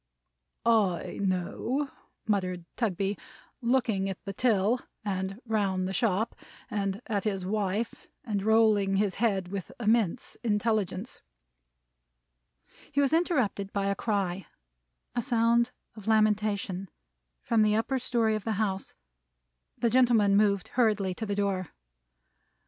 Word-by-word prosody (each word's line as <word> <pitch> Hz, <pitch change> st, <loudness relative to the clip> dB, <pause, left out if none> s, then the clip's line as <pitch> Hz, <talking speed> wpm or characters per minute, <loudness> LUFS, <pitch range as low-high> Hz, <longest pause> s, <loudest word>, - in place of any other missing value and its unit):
"I 210 Hz, -7 st, +2 dB
know," 200 Hz, +9 st, -1 dB, 0.3 s
muttered 185 Hz, -4 st, 0 dB
Mr. -, -, -22 dB
Tugby, 200 Hz, -3 st, -1 dB, 0.4 s
looking 235 Hz, -6 st, +1 dB
at 190 Hz, -, -4 dB
the 195 Hz, -, -4 dB
till, 225 Hz, +1 st, +2 dB, 0.3 s
and 190 Hz, 0 st, -2 dB
round 195 Hz, -5 st, 0 dB
the 190 Hz, -, -3 dB
shop, 215 Hz, +1 st, +1 dB, 0.4 s
and 200 Hz, +2 st, -2 dB
at 205 Hz, -4 st, -1 dB
his 195 Hz, -4 st, -1 dB
wife; 205 Hz, +2 st, -2 dB, 0.2 s
and 210 Hz, -6 st, -2 dB
rolling 215 Hz, -2 st, +4 dB
his 200 Hz, -1 st, +2 dB
head 195 Hz, -6 st, +1 dB
with 195 Hz, -2 st, -5 dB
immense 220 Hz, -5 st, +1 dB
intelligence. 215 Hz, -1 st, -1 dB, 1.7 s
He 285 Hz, -, 0 dB
was 280 Hz, +1 st, +3 dB
interrupted 255 Hz, -, +1 dB
by 200 Hz, -1 st, 0 dB
a 200 Hz, -, +1 dB
cry 195 Hz, -4 st, -1 dB, 0.7 s
a 240 Hz, -, 0 dB
sound 235 Hz, -1 st, +3 dB, 0.3 s
of 215 Hz, -2 st, -11 dB
lamentation 210 Hz, -3 st, +1 dB, 0.5 s
from 230 Hz, -2 st, +2 dB
the 210 Hz, 0 st, +4 dB
upper 260 Hz, +4 st, 0 dB
story 235 Hz, -3 st, +1 dB
of 215 Hz, -2 st, -2 dB
the 225 Hz, -, -1 dB
house. 195 Hz, -2 st, -2 dB, 0.8 s
The 235 Hz, -, +1 dB
gentleman 235 Hz, -5 st, +4 dB
moved 200 Hz, -2 st, +2 dB
hurriedly 215 Hz, -6 st, +2 dB
to 220 Hz, +4 st, -5 dB
the 200 Hz, -, -1 dB
door. 195 Hz, -3 st, 0 dB
210 Hz, 125 wpm, -29 LUFS, 195-230 Hz, 1.7 s, rolling